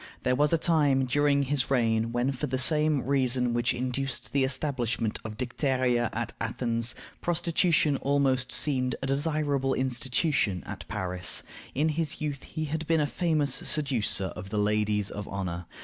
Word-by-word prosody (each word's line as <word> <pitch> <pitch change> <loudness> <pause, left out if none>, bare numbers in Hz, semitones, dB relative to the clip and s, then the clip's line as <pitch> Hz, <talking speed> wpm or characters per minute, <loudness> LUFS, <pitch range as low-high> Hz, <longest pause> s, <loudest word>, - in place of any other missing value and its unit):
There 125 - +2
was 150 +2 +2
a 165 - +4
time 145 -5 +3
during 140 +2 +2
his 135 -1 0
reign 115 -3 +2
when, 120 +3 +1
for 140 +3 -3
the 130 0 -1
same 150 +1 +2
reason 125 -2 +2
which 120 +1 +1
induced 130 +2 -3
the 140 -1 +3
establishment 130 -5 -1
of 110 -1 -7
Dicteria 125 -2 0
at 115 0 -3
Athens, 115 0 0 0.3
prostitution 170 -3 +2
almost 135 -2 +1
seemed 130 -4 +1
a - - 0
desirable 140 -1 0
institution 130 - 0
at - - -8
Paris. 90 -2 -1 0.3
In 150 +4 +2
his 155 0 -2
youth 145 -3 -3
he 155 - -4
had 160 +1 -3
been 165 -1 +3
a 150 - +2
famous 150 -3 0
seducer 125 -10 0
of 95 - -8
the 105 - -3
ladies 105 -1 +1
of 105 -1 -6
honor. 90 -3 -4
130 Hz, 160 wpm, -28 LUFS, 115-145 Hz, 0.3 s, a